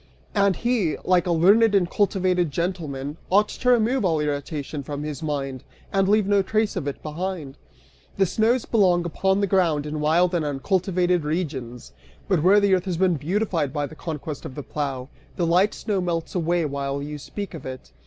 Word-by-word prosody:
And 200 -2 +3
he, 230 -6 0
like 180 -1 +3
a - - +1
learned 200 +6 +5
and 185 -3 +3
cultivated 185 -3 +1
gentleman, 150 -3 -3
ought 205 +3 +4
to 250 - -1
remove 245 +1 +3
all 165 -4 +2
irritation 145 0 -3
from 145 +1 -5
his 150 -3 -5
mind, 135 -4 -3 0.3
and 195 -1 +2
leave 210 0 +4
no 200 0 +3
trace 215 +2 0
of 165 -7 -3
it 140 - -5
behind. 155 -2 -4 0.6
The 195 - +4
snows 225 +6 +1
belong 180 -6 +3
upon 190 +4 +1
the - - +3
ground 170 -6 +1
in 150 0 -4
wild 170 +4 +2
and 170 -3 +1
uncultivated 180 +4 0
regions, 140 - -4 0.3
but 180 -5 +2
where 190 +5 +6
the 200 -1 +3
earth 185 0 +2
has 180 -3 -2
been 185 0 +3
beautified 165 -1 -1
by 145 0 -1
the 150 - -10
conquest 155 -2 -6
of 130 - -8
the 145 - -6
plough, 135 -4 -4 0.3
the 175 - 0
light 180 +5 +3
snow 205 -4 -2
melts 170 -2 -2
away 170 -1 +1
while 140 -1 -3
you 150 +1 -6
speak 200 +7 -7
of 165 - -8
it. 130 - -8
175 Hz, 190 wpm, -24 LUFS, 150-195 Hz, 0.6 s, where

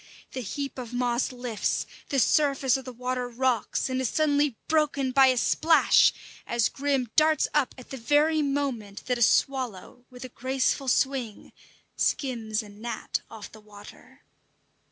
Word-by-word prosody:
The 260 - -5
heap 275 +4 -5
of 245 -1 -7
moss 245 0 0
lifts, 245 -3 -2 0.2
the 280 - -1
surface 275 0 +3
of 265 -2 -4
the 255 - -6
water 250 0 -3
rocks 245 -1 -1
and 260 0 -2
is 255 - 0
suddenly 290 -5 +1
broken 295 -4 +1
by 270 0 +6
a 255 -1 +2
splash 320 +6 +4 0.4
as 235 -1 +1
Grim 270 -4 -1
darts 310 0 +3
up 260 - +1
at 255 - -13
the 270 - -5
very 295 +5 +2
moment 275 -8 -3
that 250 -1 -1
a - - -5
swallow, 245 -2 0
with 250 0 -10
a - - -9
graceful 260 +2 -1
swing, 255 -4 -1 0.4
skims 230 -5 -1
a 210 - -12
gnat 220 +3 -5
off 215 -2 -10
the 220 - -14
water. 210 -1 -15
255 Hz, 155 wpm, -26 LUFS, 235-275 Hz, 0.4 s, by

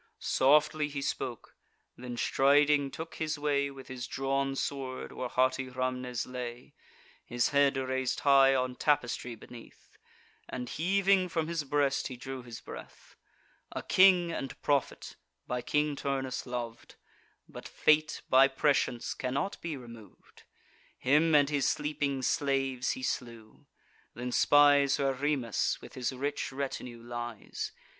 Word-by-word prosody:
Softly 150 +2 +3
he 140 -1 -5
spoke; 125 -4 -4 0.4
then 125 -1 -7
striding 145 +2 +3
took 160 +3 -8
his 155 -1 -2
way, 145 -1 0
With 135 -1 -11
his 125 -1 -6
drawn 135 0 -1
sword, 135 -2 -4
where 125 - -5
haughty 130 +1 +1
Rhamnes 125 -1 -3
lay; 125 -1 -7 0.5
His 120 0 0
head 140 -1 +3
rais'd 130 -1 -1
high 135 -1 +6
on 125 -1 -1
tapestry 125 -4 0
beneath, 115 +1 -14 0.6
And 125 -1 -5
heaving 190 +2 +2
from 165 -2 -1
his 165 -2 -2
breast, 140 -1 +1
he 130 - -8
drew 130 +1 -6
his 120 -2 -10
breath; - - -11 0.6
A - - -4
king 185 -2 +5
and 135 -5 -5
prophet, 140 -3 -1 0.3
by 125 0 -3
King 150 +2 0
Turnus 135 -2 -3
lov'd: 120 -2 -6 0.5
But - - -10
fate 155 0 +2
by 135 +1 +6
prescience 135 -3 0
cannot 140 +9 -3
be 165 -4 -4
remov'd. 115 -4 -14 0.5
Him 150 +4 +3
and 145 -1 +5
his 145 -2 +1
sleeping 145 -3 -2
slaves 135 -3 0
he 130 - -8
slew; 115 -4 -5 0.5
then 125 +1 -4
spies 145 0 +5
Where 135 -1 +1
Remus, 135 -4 -1
with - - -12
his 125 0 -2
rich 140 +3 -3
retinue, 130 -3 -5
lies. 120 -2 -5
135 Hz, 135 wpm, -30 LUFS, 125-145 Hz, 0.6 s, high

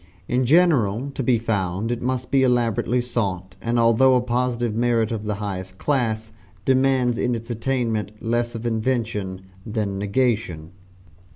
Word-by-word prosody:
In 125 +1 +1
general, 140 - +3
to 135 - -4
be 125 -1 +3
found, 105 -1 -1
it 120 - -2
must 130 0 -2
be 135 0 +4
elaborately 120 -1 +2
sought, 95 -7 -3
and 115 +1 0
although 115 +3 +5
a 125 - +3
positive 120 -1 -1
merit 115 -1 +1
of 110 -2 -3
the 105 -1 -1
highest 95 -2 -5
class, 110 -6 -1 0.3
demands 130 -2 +2
in 125 - +1
its 115 +1 -6
attainment 115 -3 -1
less 120 +1 -1
of 115 +1 -6
invention 110 -5 -1 0.2
than 105 -3 -2
negation. 100 -6 -1
115 Hz, 150 wpm, -23 LUFS, 105-125 Hz, 0.3 s, although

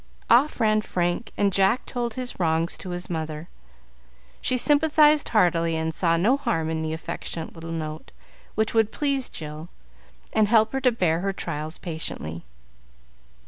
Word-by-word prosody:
Off 270 +4 +4
ran 215 -2 +3
Frank, 175 +2 -2
and 200 -1 +2
Jack 195 +6 +2
told 240 -3 -3
his 255 -4 -5
wrongs 165 0 +1
to 185 - -8
his 175 0 -4
mother. 160 -1 -4 0.9
She 255 - +1
sympathized 300 +2 +4
heartily, 170 -6 +2
and 160 0 -1
saw 165 0 +2
no 225 +11 +3
harm 160 - -1
in 160 0 -2
the 160 0 -2
affectionate 165 0 -5
little 165 0 -9
note, 155 -1 -5 0.5
which 220 0 +1
would 220 -1 +3
please 275 -3 -1
Jill, 155 +1 -8 0.6
and 215 -1 +4
help 220 +1 +4
her 270 - -1
to 250 - +4
bear 175 -8 +1
her 195 +2 -1
trials 155 -3 -4
patiently. 85 - -5
180 Hz, 155 wpm, -25 LUFS, 160-235 Hz, 0.9 s, Off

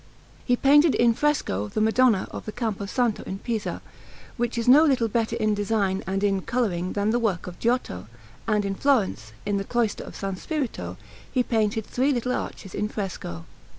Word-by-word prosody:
He 245 - +2
painted 290 +4 +5
in 235 -1 +4
fresco 245 - 0
the 160 - -3
Madonna 220 -1 +3
of - - -7
the - - -3
Campo 215 -4 -3
Santo 240 0 0
in 190 - -4
Pisa, 220 0 -3 0.5
which 240 0 -2
is 230 - -1
no 280 +5 +8
little 265 -7 +3
better 225 +1 0
in 215 0 +1
design 205 -2 0
and 195 +1 -1
in 195 -2 +2
colouring 185 -7 -1
than 205 +1 +1
the 240 - +2
work 210 -7 -1
of 180 -1 -9
Giotto; 230 - -1 0.4
and 210 -2 +2
in 195 - -1
Florence, 195 - +1
in 205 -1 0
the 195 - -1
cloister 230 0 -1
of - - -10
S. 195 -2 -3
Spirito, 230 - -3 0.3
he 250 - +2
painted 220 -2 0
three 265 +3 +1
little 250 -1 -1
arches 195 -6 -4
in 210 +1 -1
fresco. 175 - -5
220 Hz, 185 wpm, -25 LUFS, 195-245 Hz, 0.5 s, no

